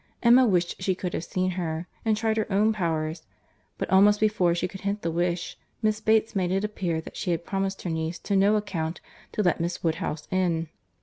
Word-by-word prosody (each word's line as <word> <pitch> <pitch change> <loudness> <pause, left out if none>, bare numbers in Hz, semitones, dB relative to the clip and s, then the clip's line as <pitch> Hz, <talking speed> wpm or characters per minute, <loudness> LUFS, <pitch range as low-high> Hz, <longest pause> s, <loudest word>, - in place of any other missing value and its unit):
—Emma 245 +2 +7
wished 180 -3 0
she 185 0 +1
could 180 -1 -4
have - - -2
seen 185 +1 -1
her, 170 -2 -3 0.2
and 220 -2 +2
tried 220 0 +1
her 220 -1 -1
own 210 +3 +3
powers; 160 -4 -2 0.6
but, - - -2
almost 205 +2 +6
before 200 -5 +2
she 175 - -1
could 190 +1 -10
hint 200 +1 -2
the 165 - 0
wish, 175 +1 -2 0.2
Miss 215 0 +1
Bates 220 0 +2
made 185 -2 +1
it 195 +2 +1
appear 180 -6 -2
that - - -11
she - - -3
had 170 -1 -1
promised 195 0 -2
her 180 - -2
niece 160 +1 -3
on 195 - +4
no 205 +2 +4
account 175 -6 -2 0.3
to 210 - 0
let 175 -2 +2
Miss 170 +1 -3
Woodhouse 160 -2 -2
in. 170 -4 0
185 Hz, 210 wpm, -26 LUFS, 170-210 Hz, 0.6 s, Emma